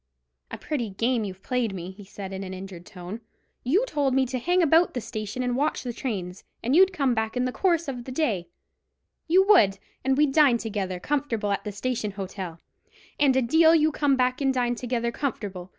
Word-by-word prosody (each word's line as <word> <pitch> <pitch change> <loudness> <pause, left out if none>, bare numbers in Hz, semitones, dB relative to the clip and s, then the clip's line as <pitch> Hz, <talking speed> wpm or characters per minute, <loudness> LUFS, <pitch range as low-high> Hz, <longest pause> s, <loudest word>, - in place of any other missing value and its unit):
"A - - -6
pretty 265 -8 -3
game 230 +4 0
you've 190 -1 -8
played 240 -5 -1
me," 180 0 -6
he 200 +2 -13
said, 195 0 -8
in 190 +1 -5
an 190 0 -6
injured 185 -2 -9
tone. 185 +5 -8 0.4
"You 360 - +2
told 285 - 0
me 265 0 +3
to 255 0 -3
hang 355 +7 +2
about 325 +1 +4
the - - 0
station 215 +2 -5
and 245 -1 0
watch 290 +4 0
the 245 -2 -4
trains, 195 -7 -5 0.2
and 250 +5 +1
you'd 380 +2 +6
come 275 -8 +1
back 220 +1 -2
in 250 - +1
the 255 - -1
course 340 +1 +1
of 250 -3 -5
the 260 - -7
day—you 305 - -2
would—and 260 - +3
we'd 295 -2 +3
dine 285 -6 +5
together 200 -5 -3
comfortable 230 -5 -1
at 200 - -1
the 210 - -3
Station 225 +1 -2
Hotel; 190 -3 -6 0.6
and 280 -3 +4
a 265 - +3
deal 320 +6 +5
you 310 -1 +3
come 290 -2 +2
back 255 +1 0
and 270 -1 +3
dined 245 -1 0
together 240 -1 -1
comfortable. 200 -9 -4
245 Hz, 200 wpm, -26 LUFS, 200-280 Hz, 0.6 s, you'd